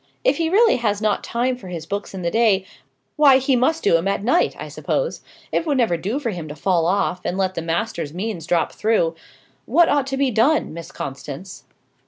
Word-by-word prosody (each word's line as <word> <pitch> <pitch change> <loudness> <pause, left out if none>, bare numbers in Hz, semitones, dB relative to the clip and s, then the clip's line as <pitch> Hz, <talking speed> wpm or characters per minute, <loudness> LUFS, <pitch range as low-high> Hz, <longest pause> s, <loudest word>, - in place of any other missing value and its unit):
If 275 - +3
he 330 -1 0
really 445 +5 +4
has 210 -4 0
not 215 -1 0
time 250 +2 -1
for 245 -6 -12
his 170 -3 -6
books 200 +2 -5
in 185 - -6
the 170 - 0
day, 215 -4 +3 0.5
why 285 -3 +7
he 265 0 +1
must 315 +7 +1
do 165 - +4
'em 165 +4 -2
at 200 0 -1
night, 290 +10 +2
I - - -7
suppose; - - -2 0.3
it - - +1
would 285 -3 +1
never 230 -9 +2
do 200 +10 -2
for 260 -6 -2
him 170 -5 -6
to 150 - -7
fall 170 +1 +1
off, 180 -1 0
and 180 - -2
let 190 -1 0
the 165 - -3
master's 165 -2 -2
means 180 -1 -5
drop 170 -2 +1
through. 215 -7 +1 0.5
What 330 +7 +4
ought 285 -2 +1
to 270 0 -2
be 270 -2 +1
done, 240 - +2
Miss 170 0 -8
Constance?" 140 +7 -7
210 Hz, 220 wpm, -21 LUFS, 175-260 Hz, 0.5 s, why